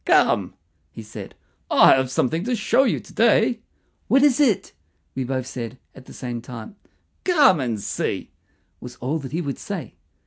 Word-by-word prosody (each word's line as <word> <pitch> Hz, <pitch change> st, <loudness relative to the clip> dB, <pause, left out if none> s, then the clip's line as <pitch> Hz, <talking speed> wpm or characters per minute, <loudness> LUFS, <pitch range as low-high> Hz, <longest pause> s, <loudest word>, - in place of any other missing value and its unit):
"Come," -, -, +3 dB, 0.3 s
he 115 Hz, -, -10 dB
said; 105 Hz, -, -10 dB, 0.3 s
"I -, -, +7 dB
have 130 Hz, -1 st, +1 dB
something 145 Hz, +6 st, 0 dB
to 250 Hz, 0 st, 0 dB
show 230 Hz, +4 st, +3 dB
you 240 Hz, -, +1 dB
to -, -, -15 dB
day." 230 Hz, +1 st, +3 dB, 0.5 s
"What 270 Hz, +1 st, +4 dB
is 290 Hz, -2 st, +4 dB
it?" 245 Hz, -, +2 dB, 0.4 s
we 130 Hz, -, -2 dB, 0.2 s
said 120 Hz, -3 st, -6 dB
both 130 Hz, -, -21 dB
at 130 Hz, -, -14 dB
the -, -, -14 dB
same 120 Hz, -2 st, -5 dB
time. 120 Hz, -, -9 dB, 0.5 s
"Come 290 Hz, -, +5 dB
and 120 Hz, -5 st, -2 dB
see," -, -, -3 dB, 0.5 s
was 125 Hz, -1 st, -9 dB
all 140 Hz, +7 st, -2 dB
that 135 Hz, -3 st, -8 dB
he 165 Hz, +4 st, -1 dB
would 140 Hz, -5 st, -4 dB
say. -, -, -6 dB
140 Hz, 175 wpm, -23 LUFS, -, 0.5 s, I